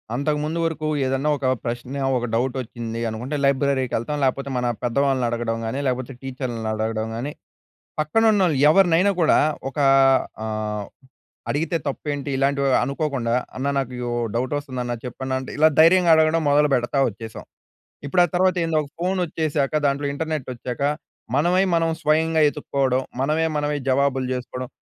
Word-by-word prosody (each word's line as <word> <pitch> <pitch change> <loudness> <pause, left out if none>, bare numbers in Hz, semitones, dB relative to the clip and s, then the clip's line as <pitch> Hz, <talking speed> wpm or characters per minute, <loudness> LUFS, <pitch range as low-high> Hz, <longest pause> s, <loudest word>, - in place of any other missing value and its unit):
అంతకు 150 +3 0
ముందు 160 +2 -2
వరుకు 160 -1 -2 0.2
ఏదన్నా 135 +3 0
ఒక 135 - -5 0.2
ప్రశ్న 125 +4 -4 0.2
ఒక 120 - -2
డౌట్ 125 +2 0
వచ్చింది 115 -1 -6
అనుకుంటే, 125 +7 -4
లైబ్రరీకి 140 -2 +1
ఎళ్తాం 145 +5 -3
లేపోతే 135 +1 -1
మన 125 - -1 0.2
పెద్దవాళ్ళని 130 +1 +1
అడగడం 115 -1 -2
గానీ 115 +5 -3
లేపోతే 130 +1 -2
టీచర్‌లని 125 -4 -4
అడగడం 110 0 -2
గానీ, 130 +6 -4 0.7
పక్కనున్నోళ్ళు 190 -1 +3
ఎవరినైనా 185 +1 +4
కూడా 160 - +4 0.3
ఒకా 140 +1 +1 0.6
ఆహ్, 105 -1 -3 0.6
అడిగితే 165 +3 0
తప్పేంటి 145 0 -3
ఇలాంటివి 140 0 +1
అనుకోకుండా 135 -4 -1 0.2
అన్నా 140 +2 -1
నాకు 130 -2 -4
యో 120 - -2 0.2
డౌట్ 125 +3 -1
వస్తందన్నా 125 -4 -4
చెప్పన్నా 130 +1 -4
అంటే 130 - -7
ఇలా 155 - +6
ధైర్యంగా 170 +1 +6
అడగడం 160 +1 +3
మొదలుపెడతా 140 -3 +2
వచ్చేశాం. 110 +2 -9 0.6
ఇప్పుడు 175 +5 +3
ఆ - - +3
తర్వాత 185 0 +3
ఏందో 165 -1 0
ఒక 145 - -10
ఫోన్ 185 +2 0
వచ్చేశాక 155 -3 -1
దాంట్లో 140 +1 0
ఇంటర్నెట్ 155 -1 -3
వచ్చాక 125 +2 -6 0.5
మనమై 175 +6 +3
మనం 165 0 +2
స్వయంగా 160 +1 +2
ఎతుక్కోడం, 135 -3 0 0.2
మనమే 155 +4 +1
మనమే 150 0 -1
జవాబులు 135 0 +1
చేసుకోడం. 125 0 -5
140 Hz, 145 wpm, -22 LUFS, 125-155 Hz, 0.7 s, ఇలా